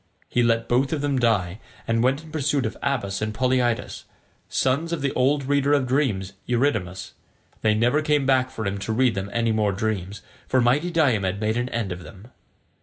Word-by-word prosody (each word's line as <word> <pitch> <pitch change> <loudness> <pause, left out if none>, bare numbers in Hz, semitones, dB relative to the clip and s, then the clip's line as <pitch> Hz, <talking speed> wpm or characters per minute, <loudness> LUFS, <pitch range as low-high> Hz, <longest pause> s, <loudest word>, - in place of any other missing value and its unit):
He 120 - +1
let 115 -1 +2
both 130 +2 +1
of 150 - -1
them 145 -1 0
lie, 105 -6 +1 0.3
and 115 0 +1
went 135 +5 +1
in 160 - -13
pursuit 145 -3 0
of 110 - -3
Abas 105 -8 -1
and 110 0 -2
Polyidus, 125 -1 0 0.4
sons 140 +6 0
of 165 -4 -2
the 140 - 0
old 140 +3 +2
reader 140 +1 +2
of 140 -3 +2
dreams 120 -8 0
Eurydamas: 110 -8 -1 0.5
they 110 -1 +3
never 120 +7 +2
came 150 -2 +1
back 130 -1 +3
for 110 -4 -6
him 100 0 -2
to 110 +3 -3
read 125 0 +3
them 95 0 -4
any 115 -1 +1
more 105 -2 +1
dreams, 100 -1 -3 0.2
for 130 - +2
mighty 130 +8 +2
Diomed 110 - +1
made 110 +1 0
an 120 +1 -1
end 115 -6 -2
of 90 0 -5
them. 100 +6 -13
120 Hz, 195 wpm, -24 LUFS, 110-135 Hz, 0.5 s, they